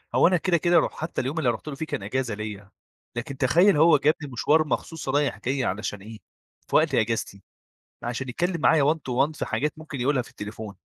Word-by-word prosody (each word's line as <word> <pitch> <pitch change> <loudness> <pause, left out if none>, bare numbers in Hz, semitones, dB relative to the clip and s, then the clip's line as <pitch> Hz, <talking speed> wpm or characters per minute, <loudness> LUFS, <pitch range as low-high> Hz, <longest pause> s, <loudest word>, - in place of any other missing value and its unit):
هو - - +6
أنا 180 0 +3
كده 175 +1 +1
كده 175 +2 +2
لو - - 0
حتى 160 +1 -4
اليوم 135 +5 -4
اللي 140 -6 +2
أنا 120 - +1
رُحت 130 - -13
له 145 - -4
فيه 160 +3 -4
كان 100 - -4
إجازة 125 +2 -2
ليَّ، 105 -2 -7 0.5
لكن 130 +3 -5
تخيل 170 +8 +4
هو 160 0 +6
جابني 145 0 0
مشوار 155 +6 +2
مخصوص 160 -3 -3
رايح 145 +1 +1
جاي 130 +1 -1
علشان 105 -1 -3
إيه؟ 110 +1 -10 0.5
في - - -3
وقت 155 -4 +4
أجازتي 110 -3 -1 0.6
علشان 125 +2 -4
يتكلم 175 +6 -1
معايا 150 -2 +4
one - - -11
to 135 -5 -6
one 155 - -12
في - - -2
حاجات 150 +1 -1
ممكن 155 -4 -7
يقولها 130 +1 +1
في - - -15
التليفون. 105 0 -7
135 Hz, 220 wpm, -25 LUFS, 115-155 Hz, 0.6 s, هو